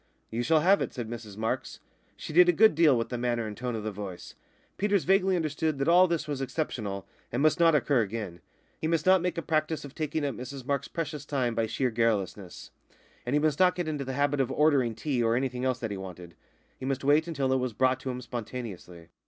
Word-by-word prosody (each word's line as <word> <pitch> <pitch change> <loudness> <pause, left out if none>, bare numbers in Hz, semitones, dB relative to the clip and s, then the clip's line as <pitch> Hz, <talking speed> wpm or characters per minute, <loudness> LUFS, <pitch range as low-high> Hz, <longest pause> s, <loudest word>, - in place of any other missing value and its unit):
"You 115 +2 -1
shall 155 +5 +3
have 195 +5 +4
it," - - -3
said 120 -4 -4
Mrs 110 -3 -8
Marks. 110 +1 -3 0.4
She - - -7
did 180 +2 +7
a - - +5
good 220 +3 +6
deal 155 -5 +5
with 115 - -2
the 125 - -3
manner 120 -1 -1
and 105 -1 -6
the - - -15
tone 125 -1 -3
of 110 - -4
the 110 - -3
voice. 100 -3 -8 0.5
Peters 200 -2 +2
vaguely 190 0 +3
understood 155 -2 -1
that 140 - -1
all 180 +2 +6
this 170 -3 -2
was 145 -2 -3
exceptional, 115 -8 -3 0.3
and 120 - -1
must 155 +3 +3
not 165 -2 +5
occur 140 -2 +3
again; 100 -5 -5 0.4
he 160 - -1
must 165 -1 0
not 185 -1 +5
make 180 0 -2
a 170 - -2
practice 155 -1 -1
of 140 - -10
taking 155 -1 -2
up 140 - -1
Mrs 130 +1 -8
Marks's 140 -1 -1
precious 150 -3 -4
time 130 -5 -1
by 115 -1 0
sheer 120 +3 -1
garrulousness; 105 -5 -2 0.6
and 130 - +1
he - - +4
must 150 -1 +1
not 185 -1 +5
get 175 -3 -3
into 150 -3 -2
the 130 0 -4
habit 145 0 +2
of 130 -1 -1
ordering 135 -6 +2
tea 135 -3 -1
or 115 0 +2
anything 125 -1 -2
else 130 -2 +1
that 115 -4 -4
he 100 - -4
wanted 90 -2 -9 0.5
he - - -6
must 135 0 -2
wait 150 +4 +3
until 140 -5 0
it - - +3
was 130 -1 -2
brought 130 +3 +2
to 130 - -5
him 125 0 -4
spontaneously. 110 -8 -7
130 Hz, 240 wpm, -28 LUFS, 115-155 Hz, 0.6 s, did